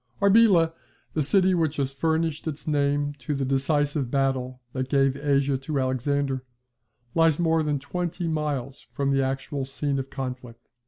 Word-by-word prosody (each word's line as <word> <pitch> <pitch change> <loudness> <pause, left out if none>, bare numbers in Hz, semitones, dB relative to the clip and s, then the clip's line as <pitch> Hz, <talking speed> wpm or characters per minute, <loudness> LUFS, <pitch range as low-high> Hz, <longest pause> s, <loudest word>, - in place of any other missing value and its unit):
Arbela, 200 -5 +5 0.4
the 155 - 0
city 185 +6 +3
which 160 -4 +1
has 135 -2 -1
furnished 160 +2 -1
its 155 0 -5
name 145 -1 +1
to 145 +1 -3
the 135 -1 -1
decisive 140 0 0
battle 130 -1 0
that 130 0 -3
gave 135 -1 +3
Asia 140 -1 +1
to 140 +1 -2
Alexander, 130 +1 0 0.7
lies 165 -2 +4
more 165 -2 +2
than 150 -2 0
twenty 175 +4 -3
miles 145 -4 -3
from 140 -1 -1
the 135 0 +2
actual 135 +1 -2
scene 140 +1 -2
of 135 0 -5
conflict. 125 -3 -7
140 Hz, 155 wpm, -25 LUFS, 135-155 Hz, 0.7 s, Arbela